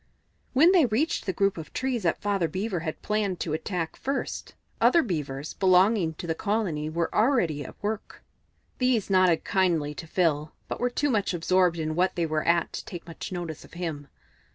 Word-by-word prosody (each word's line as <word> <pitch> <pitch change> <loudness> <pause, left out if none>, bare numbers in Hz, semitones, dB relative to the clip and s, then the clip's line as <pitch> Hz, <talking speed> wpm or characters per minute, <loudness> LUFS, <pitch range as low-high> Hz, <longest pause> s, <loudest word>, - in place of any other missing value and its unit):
When 315 +7 +6
they 345 -8 +5
reached 245 +7 0
the - - +2
group 195 0 +1
of 160 - -9
trees 260 -3 -1
that 170 -4 0
Father 200 -4 +1
Beaver 190 +1 -2
had 160 -1 -5
planned 210 -4 -1
to 155 - -2
attack 165 0 -3
first, 275 +1 -4 0.3
other 335 -1 +5
Beavers 150 - -4
belonging 185 -2 +3
to 170 - -7
the 165 - 0
colony 180 -6 -1
were 165 +1 -2
already 210 - +2
at - - -10
work. 210 0 -4 0.6
These 250 -6 +1
nodded 185 -3 +4
kindly 170 -6 +1
to 165 +2 -8
Phil, 155 -3 0
but - - -4
were 245 - +1
too 290 +3 0
much 205 -5 +1
absorbed 180 0 +2
in 155 -1 -2
what 180 +3 +1
they 170 - 0
were 155 -1 -1
at 170 0 +2
to - - -5
take 175 -2 -8
much 165 +2 -7
notice 170 -4 -5
of - - -17
him. 160 -5 -4
180 Hz, 190 wpm, -27 LUFS, 160-210 Hz, 0.6 s, When